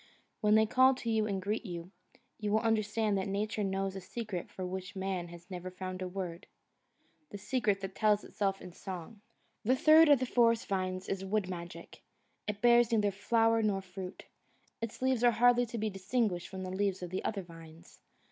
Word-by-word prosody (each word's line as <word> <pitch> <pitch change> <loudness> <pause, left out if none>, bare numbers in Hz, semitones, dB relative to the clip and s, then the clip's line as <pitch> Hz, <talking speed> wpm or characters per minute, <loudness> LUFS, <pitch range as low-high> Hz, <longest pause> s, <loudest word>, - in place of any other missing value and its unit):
When 210 -1 +4
they 220 0 +5
call 260 +4 +5
to 235 -2 -3
you 220 -1 +2
and 195 -2 -1
greet 205 +5 -2
you, 175 -3 -7 0.5
you 210 -1 -2
will 215 +1 +3
understand 215 -2 +1
that 190 - -2
Nature 210 +2 -1
knows 195 0 -1
a 190 - -5
secret 210 -3 -5
for 185 - -6
which 185 +2 -5
man 190 -2 -2
has 175 +2 -13
never 180 0 -5
found 185 0 -6
a 185 - -2
word 180 -2 -6 0.8
the 205 - -7
secret 205 -2 0
that 195 0 -5
tells 210 -1 +2
itself 195 -1 -2
in 180 - -9
song. 190 +3 -8 0.4
The 255 +5 +3
third 310 +3 +7
of 290 - +8
the 255 - 0
forest 230 -2 +3
vines 185 -1 -2
is 195 -1 -2
Wood 195 0 0
Magic. 175 0 -8 0.5
It 210 -1 -3
bears 240 -1 +5
neither 210 -3 +2
flower 225 +3 +2
nor 200 -3 0
fruit. 185 0 -8 0.6
Its 230 +2 -5
leaves 260 -2 +2
are 240 - +7
hardly 245 +1 +4
to 235 - -5
be 215 -1 -1
distinguished 195 -1 -1
from 190 -1 -7
the 185 - -5
leaves 195 -1 -1
of 175 - -6
the 185 - -3
other 200 -3 -2
vines. 165 0 -14
200 Hz, 195 wpm, -32 LUFS, 185-225 Hz, 0.8 s, of